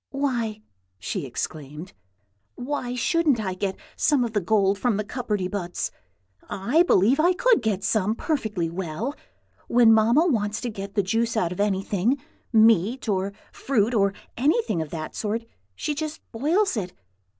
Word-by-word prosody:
"Why!" 240 -6 -2 0.3
she 95 +8 -4
exclaimed, 150 +6 -6 0.6
"why 250 -1 -3
shouldn't 300 0 +2
I 190 -4 -2
get 190 +1 -3 0.2
some 290 -4 +2
of 230 - -5
the 210 - +1
gold 195 +1 +2
from 240 -5 +1
the 210 - -1
cupperty 210 -4 -2
buts? 180 -3 -3 0.6
I 240 - +2
believe 255 - +4
I 350 +4 +4
could 475 +5 +3
get 205 -4 -1
some, 215 0 +1
perfectly 220 - -1
well. 175 - -4 0.5
When 235 -2 +6
Mamma 230 +9 +4
wants 210 -9 0
to 245 - -3
get 200 0 -7
the 205 - +2
juice 225 +4 0
out 175 -6 +1
of 180 - -6
anything, 200 +4 +1 0.3
meat, 225 +2 +4
or 195 -1 0 0.2
fruit, 235 -3 0
or 200 -3 +2 0.2
anything 285 - +1
of 160 - -5
that 155 -1 -6
sort, 225 +2 -2 0.3
she 300 - -2
just 310 +1 -4
boils 325 - +1
it. 185 -5 -3
220 Hz, 155 wpm, -25 LUFS, 195-255 Hz, 0.6 s, When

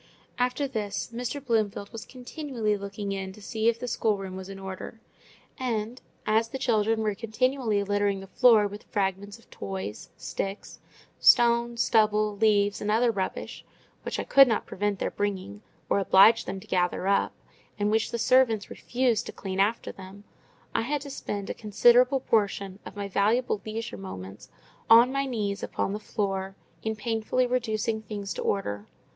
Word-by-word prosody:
After 250 +3 0
this, 215 -4 -4
Mr. 250 +4 -4
Bloomfield 215 -4 0
was 225 -1 -8
continually 250 -4 -3
looking 200 0 -5
in 195 -1 -4
to 215 - -14
see 220 +2 0
if 230 - 0
the 250 - -4
schoolroom 195 -5 -1
was 190 0 -8
in 195 - -7
order; 190 +4 -7 0.6
and, 235 -1 -2 0.2
as 220 +1 +2
the 265 - -4
children 225 -4 +1
were 210 -1 +1
continually 225 0 0
littering 205 0 0
the 195 - -9
floor 220 +1 +5
with 205 +1 -6
fragments 200 0 -2
of 230 - -23
toys, 95 +1 -6
sticks, 195 +9 -5 0.4
stones, 235 0 +4
stubble, 215 -2 +2
leaves, 205 -1 +2
and 210 - -2
other 230 +3 +3
rubbish, 190 -3 -4 0.4
which - - -4
I - - -1
could 275 -1 +7
not 225 - 0
prevent 205 +1 -2
their - - -2
bringing, 205 0 -3 0.3
or - - +2
oblige 200 +4 +6
them 190 +1 -4
to - - -13
gather 180 -1 0
up, 200 - +2 0.4
and 205 0 +1
which 220 0 +1
the - - -3
servants 235 -3 +3
refused 245 -3 0
to - - -5
"clean 190 -1 -5
after 210 +4 +1
them," 195 +1 -12 0.5
I - - +1
had 285 +5 -2
to 285 -1 -8
spend 205 -6 -5
a - - -3
considerable 245 +5 +4
portion 200 -4 0
of - - -10
my 200 -1 -4
valuable 210 +3 +1
leisure 225 +2 -5
moments 95 - -9 0.4
on 235 +3 +8
my 275 0 -1
knees 210 -5 -2
upon 195 - -2
the 210 - -3
floor, 195 -2 -3 0.3
in 220 0 -2
painsfully 225 +3 0
reducing 225 -3 -1
things 205 -2 -5
to - - -5
order. 105 - -2
215 Hz, 170 wpm, -27 LUFS, 200-235 Hz, 0.6 s, on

